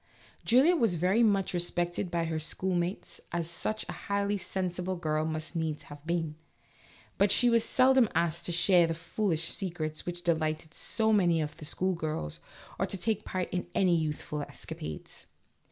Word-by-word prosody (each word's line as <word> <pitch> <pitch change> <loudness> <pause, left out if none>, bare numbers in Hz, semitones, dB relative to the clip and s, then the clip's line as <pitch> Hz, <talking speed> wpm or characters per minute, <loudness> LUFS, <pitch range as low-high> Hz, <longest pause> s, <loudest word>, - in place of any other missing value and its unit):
Julia 270 +10 +5
was 230 - +2
very 185 +7 +2
much 200 -5 +3
respected 175 +1 -1
by 170 -1 0
her 160 -1 -2
schoolmates, 175 +3 -2
as 170 -1 -1
such 215 +5 -2
a - - -4
highly 200 0 -1
sensible 185 -1 -2
girl 155 -2 0
must 155 +2 -4
needs 160 -2 -2
have 145 0 -12
been, 165 -3 0 0.9
but 200 0 +4
she 245 +2 +5
was 230 -1 +4
seldom 260 -3 +4
asked 170 0 +1
to - - -1
share 175 0 +5
the 165 - -2
foolish 170 0 -1
secrets 165 -5 -3
which 175 0 -5
delighted 160 -1 0
so 220 -1 +1
many 175 -5 +4
of 150 -1 -3
the 150 - -8
schoolgirls, 160 - -2 0.4
or - - +1
to 195 - -5
take 215 +2 -1
part 185 -1 -2
in 180 - -2
any 180 -3 +4
youthful 150 -1 -2
escapades. 80 - -8
175 Hz, 165 wpm, -30 LUFS, 160-195 Hz, 0.9 s, Julia